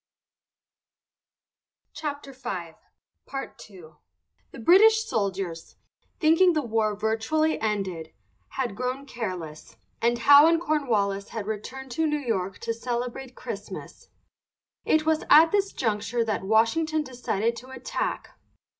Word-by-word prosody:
VIRGINIA 270 - -5 0.6
WOODWARD 270 -1 -6
CLOUD. 175 -7 -14 0.5
The - - -12
British 435 - +6
soldiers, 190 - -3 0.4
thinking 330 +3 +5
the 305 -2 0
war 220 -3 0
virtually 225 +10 0
ended, 190 -7 -2 0.4
had 245 -6 -3
grown 255 +4 -3
careless, 185 - -6 0.2
and 235 +1 +2
Howe 285 +5 +8
and 330 0 +3
Cornwallis 220 -11 0
had 220 -3 -5
returned 255 +5 -6
to 320 +5 0
New 300 0 0
York 195 -9 -2
to 230 0 -2
celebrate 245 +2 -4
Christmas. - - -8 0.8
It 310 0 +2
was 315 0 +1
at 320 +2 +8
this 400 -1 +1
juncture 225 +1 -1
that 215 -2 -1
Washington 300 +10 +2
decided 235 -4 -2
to 250 +3 -11
attack. 260 -1 -4
240 Hz, 115 wpm, -26 LUFS, 210-300 Hz, 0.8 s, Howe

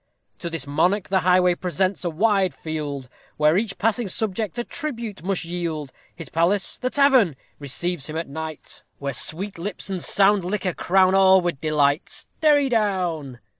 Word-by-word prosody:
_ - - -45
To 170 - -4
this 165 -4 -4
monarch 175 +8 0
the 190 0 +2
highway 180 0 +3
presents 185 +2 -1
a 175 - 0
wide 195 +2 +1
field, 145 -4 -5 0.3
Where 150 +1 +3
each 200 0 -1
passing 225 +1 0
subject 210 0 -1
a 240 - -1
tribute 235 -9 -5
must 185 0 -2
yield; 165 -5 -4 0.2
His 165 -2 -9
palace 175 +5 0
the 255 - -1
tavern! 260 - +4 0.2
receives 155 +2 -2
him 155 - -4
at 165 - -3
night, 160 +2 -7 0.2
Where 140 -1 -4
sweet 185 +8 +1
lips 195 +2 -5
and 185 -3 -3
sound 200 -1 +4
liquor 185 0 -2
crown 185 +2 +3
all 190 -1 +6
with 175 -6 -3
delight. 150 -1 0 0.2
_Derry 295 -3 +4
down. 180 - -1
180 Hz, 170 wpm, -23 LUFS, 160-205 Hz, 0.3 s, all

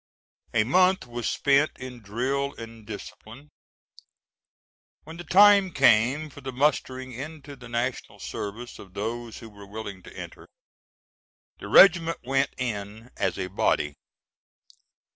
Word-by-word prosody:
A 110 - +4
month 185 - +3
was 120 -1 -4
spent 140 +2 +2
in 125 -2 -9
drill 130 +7 -2
and 115 -2 -11
discipline; 110 +5 -10 1.5
when 160 +2 -10
the 175 - -7
time 200 +2 +6
came 130 +6 +3
for 145 - -12
the 135 0 -5
mustering 130 -1 -1
into 145 +2 -8
the 125 -2 -13
national 120 +2 -3
service 110 +4 -7
of 95 -1 -14
those 115 +2 -4
who 115 - -11
were 100 -1 -13
willing 100 -2 -7
to - - -14
enter, - - -9 1.1
the - - -8
regiment 170 -3 +6
went 135 +2 +1
in 110 -1 -5
as - - -1
a 95 - -2
body. 85 -5 0
125 Hz, 130 wpm, -26 LUFS, 110-145 Hz, 1.5 s, time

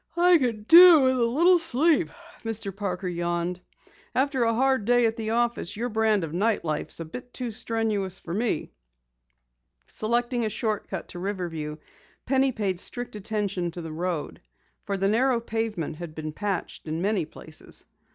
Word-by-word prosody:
"I 350 0 +6
could 230 -5 -2
do 340 -2 +10
with 260 0 +3
a - - +3
little 340 +10 +4
sleep," 325 +1 +3 0.3
Mr. 215 -4 -4
Parker 190 -2 -3
yawned. 175 0 -2 0.5
"After 270 0 +1
a 230 - +2
hard 265 -3 +2
day 245 +1 +4
at 225 0 +1
the 220 -2 -4
office, 235 -4 0
your 240 +2 -2
brand 220 -3 +2
of 160 -1 -5
night 205 +2 +1
life 155 -1 -2
is - - -5
a 165 - -4
bit 245 +10 -9
too 245 -2 -4
strenuous 215 -4 -1
for 170 - -7
me." 225 +4 -1 1.1
Selecting 240 - -1
a 220 - 0
short 215 0 -2
cut 190 - -4
route - - -31
to 175 - -8
Riverview, 175 -6 -4 0.5
Penny 265 0 +2
paid 200 -6 -2
strict 245 +3 -4
attention 205 -4 -2
to 175 +1 -7
the 160 -1 -6
road, 170 -1 -3 0.4
for 200 - -2
the 195 +1 +1
narrow 240 +4 +2
pavement 220 -9 -3
had 170 -2 -8
been 155 -1 -5
patched 200 -3 -4
in 155 +1 -2
many 200 -3 +1
places. 155 +1 -10
215 Hz, 175 wpm, -26 LUFS, 180-245 Hz, 1.1 s, do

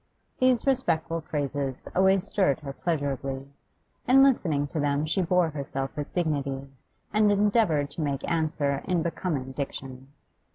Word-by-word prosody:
These 255 -2 +3
respectful 165 - +1
phrases 145 -3 -3
always 190 0 +4
stirred 185 -8 +1
her 140 -2 -6
pleasurably: 135 -3 -2 0.6
in 270 +2 +7
listening 165 - +2
to 155 - -3
them 145 +1 +1
she 160 +5 +1
bore 180 -1 +2
herself 135 -2 -4
with 145 0 -5
dignity, 140 -5 -1 0.5
and 210 -1 +4
endeavoured 200 -8 +2
to 160 - -5
make 140 -2 -2
answer 150 -4 0
in 175 -3 +1
becoming 160 -6 -2
diction. 135 -1 -6
155 Hz, 135 wpm, -27 LUFS, 140-185 Hz, 0.6 s, in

